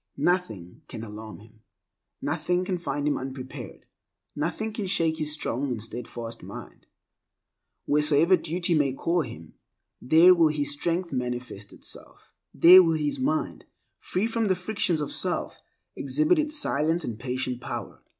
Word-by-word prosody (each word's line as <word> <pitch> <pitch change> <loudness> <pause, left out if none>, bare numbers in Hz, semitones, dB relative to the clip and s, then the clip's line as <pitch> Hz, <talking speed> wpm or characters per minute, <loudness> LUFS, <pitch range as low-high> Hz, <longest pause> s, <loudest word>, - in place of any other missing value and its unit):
Nothing 110 - -1
can 110 - -7
alarm 110 -1 -9
him, 110 0 -19 0.6
nothing 180 +1 0
can 180 -1 -2
find 145 -3 -2
him 150 - +1
unprepared, 130 0 -8 0.5
nothing 170 +9 -2
can 210 -3 -3
shake 165 -3 +1
his 155 -1 -1
strong 140 -2 -2
and 125 -4 -3
steadfast 115 0 -7
mind. - - -11 1.0
Wheresoever 150 +4 +4
duty 175 +1 -1
may 145 -4 +2
call 170 +5 0
him, 80 - -9 0.5
there 165 +7 +7
will 170 -3 +4
his 145 -2 -1
strength 170 +3 -2
manifest 125 -5 -4
itself; - - -9 0.2
there 180 +3 +9
will 165 -3 +2
his 150 - -2
mind, 305 +4 -1 0.3
free 185 +4 -1
from 225 -1 0
the 190 - +3
frictions 180 -3 -1
of 145 - -3
self, 185 - -1 0.4
exhibit 310 +2 +2
its 305 0 0
silent 160 - +1
and 115 -2 -5
patient 125 0 -3
power. - - -6
155 Hz, 145 wpm, -26 LUFS, 125-180 Hz, 1.0 s, there